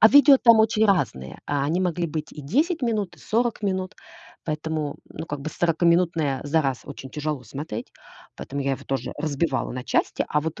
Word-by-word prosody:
А 220 - +9
видео 285 +2 +8
там 230 -2 +7
очень 220 0 +3
разные. 120 - 0
А, 145 -1 0
они 165 +5 0
могли 175 -2 0
быть 155 0 -5
и 150 - -9
10 295 - +1
минут, 215 -6 -1
и - - -22
40 230 -1 0
минут. 190 0 -1 0.5
Поэтому, 155 -1 -3
ну, - - -7
как 145 -2 -5
бы 150 - -4
сорокаминутное 165 -4 +2
за 155 +3 +2
раз 135 -3 -1
очень 135 -2 -9
тяжело 150 -2 -3
смотреть. 125 -1 -6 0.5
Поэтому 140 +1 -5
я 135 - 0
его 135 - -5
тоже 135 0 -3
разбивала 145 -3 -1
на 125 +1 -5
части. - - 0
А 150 - +1
вот 160 +1 -4
160 Hz, 190 wpm, -24 LUFS, 140-195 Hz, 0.5 s, А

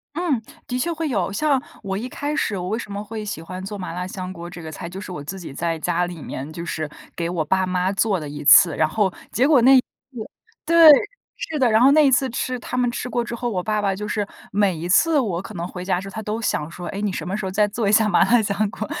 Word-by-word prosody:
嗯， 320 -9 0 0.3
的 250 - -2
确 335 +7 -1
会 325 -1 -2
有。 200 -7 -1
像 275 +5 +1 0.2
我 195 -1 -3
一 245 +4 -5
开 290 +3 -3
始 205 -9 -1
我 180 - -4
为 220 - -1
什 230 - -7
么 200 +1 -4
会 215 0 -6
喜 200 -6 -5
欢 185 +3 -7
做 205 +2 -6
麻 180 -3 -6
辣 180 +1 -4
香 185 0 -6
锅 170 -1 -8
这 175 -1 -9
个 160 - -7
菜， 170 +2 -7
就 190 - -8
是 200 - -8
我 150 -5 -6
自 190 +6 -6
己 165 -6 -8
在 165 +1 -2
家 175 +2 0
里 175 -3 -8
面， 140 +4 -6
就 170 +2 -6
是 155 -2 -3 0.3
给 170 -1 -2
我 170 -3 -1
爸 190 +4 +1
妈 185 0 0
做 195 -2 +1
了 150 - -6
一 145 +1 -7
次。 160 +2 +7
然 155 - +2
后 195 0 0 0.2
结 255 +4 +2
果 290 -5 +5
那 265 +3 +7
一 - - +7
次 - - -4 0.8
对， 335 0 +8 0.5
是 315 - -4
的， 255 -5 +3
然 220 - +5
后 265 +2 +7
那 305 +1 +6
一 275 - +4
次 265 +1 +2
吃 250 +1 -3
他 240 - -6
们 250 -1 +1
吃 245 - -4
过 240 -1 0
之 235 - -6
后， 240 +1 -3
我 185 -5 -2
爸 215 +1 0
爸 195 -1 0
就 210 +2 -5
是 210 -1 -2 0.2
每 200 -2 +2
一 165 +2 -5
次 315 - +4
我 195 -10 0
可 - - -10
能 170 0 -4
回 180 0 -7
家 185 -2 0
之 195 - -8
后 - - -11
他 220 - -5
都 215 +2 -3
想 150 -8 -1
说， 175 +1 -8
哎， 200 - -5
你 205 -1 -1
什 165 - -4
么 190 +3 -3
时 215 - -4
候 190 - -3
再 210 +2 +3
做 225 0 -2
一 - - +3
下 215 0 +4
麻 190 - +3
辣 240 -1 +5
香 205 0 0
锅。 215 - -5
200 Hz, 315 characters per minute, -22 LUFS, 180-235 Hz, 0.8 s, 对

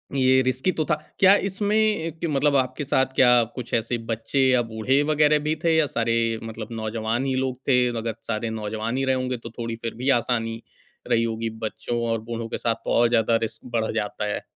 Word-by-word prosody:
ये 130 -1 +4
रिस्की 130 +7 0
तो 160 - -1
था। 155 - +1 0.2
क्या 195 +1 +7
इसमें 205 +2 -1
ए, 210 -7 +1
कि - - 0
मतलब 145 -1 +2
आपके 130 +2 -1
साथ 130 -1 +1
क्या 125 -2 +6
कुछ 125 -2 -7
ऐसे 115 +1 0
बच्चे 115 +4 -2
या 125 -1 +4
बूढ़े 130 +6 +1
वग़ैरह 150 0 +4
भी 150 +1 -1
थे 165 -1 +3
या 160 -1 +4
सारे 115 -4 -1 0.3
मतलब 110 -1 -6
नौजवान 110 +2 -2
ही 135 -1 0
लोग 130 -1 -1
थे? 125 -2 +4
अगर 115 -1 -3
सारे 115 0 -2
नौजवान 110 +2 -3
ही 135 - 0
रहे 130 0 +2
होंगे 130 -1 -2
तो 115 0 -9
थोड़ी 115 -1 -3
फिर 115 - -4
भी 125 +4 -2
आसानी 115 -1 -2 0.5
रही 115 - +3
होगी, 115 0 -2
बच्चों 110 +2 -4
और 115 -1 -1
बूढ़ों 115 0 -5
के - - -3
साथ 115 -1 0
तो - - -2
और 120 0 +4
ज़्यादा 115 -1 +2
रिस्क 110 0 -10
बढ़ 110 -1 0
जाता 105 0 -2
है। - - -3
120 Hz, 215 wpm, -24 LUFS, 115-135 Hz, 0.5 s, क्या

